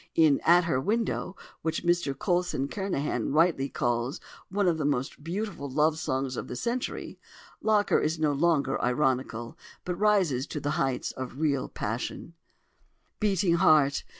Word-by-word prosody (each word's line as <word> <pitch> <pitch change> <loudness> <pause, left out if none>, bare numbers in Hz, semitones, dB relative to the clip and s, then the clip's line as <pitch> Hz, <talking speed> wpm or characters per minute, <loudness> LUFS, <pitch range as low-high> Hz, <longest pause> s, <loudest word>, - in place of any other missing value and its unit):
In 155 -4 +5
"At 175 +2 +6
Her 145 -6 0
Window," 215 - -1 0.3
which 160 +1 -2
Mr 170 -6 +1
Coulson 175 -5 0
Kernahan 190 -9 -2
rightly 155 -4 +3
calls 120 +2 -1 0.3
"one 200 0 +1
of 165 -2 +1
the - - -1
most 140 0 -2
beautiful 175 -3 -4
love 155 +3 +2
songs 130 -3 -2
of - - -5
the - - -6
century," 240 - -3 0.4
Locker 215 -2 +3
is 160 +2 0
no 155 -2 +1
longer 145 -3 +1
ironical, 125 +1 -1 0.3
but 180 - -1
rises 180 -9 +2
to 150 - -4
the 145 +1 -2
heights 135 -4 -1
of 130 0 -7
real 145 -4 0
passion: 115 +9 -4 0.9
"Beating 195 -5 +2
Heart! 150 -6 +4
155 Hz, 150 wpm, -28 LUFS, 135-175 Hz, 0.9 s, At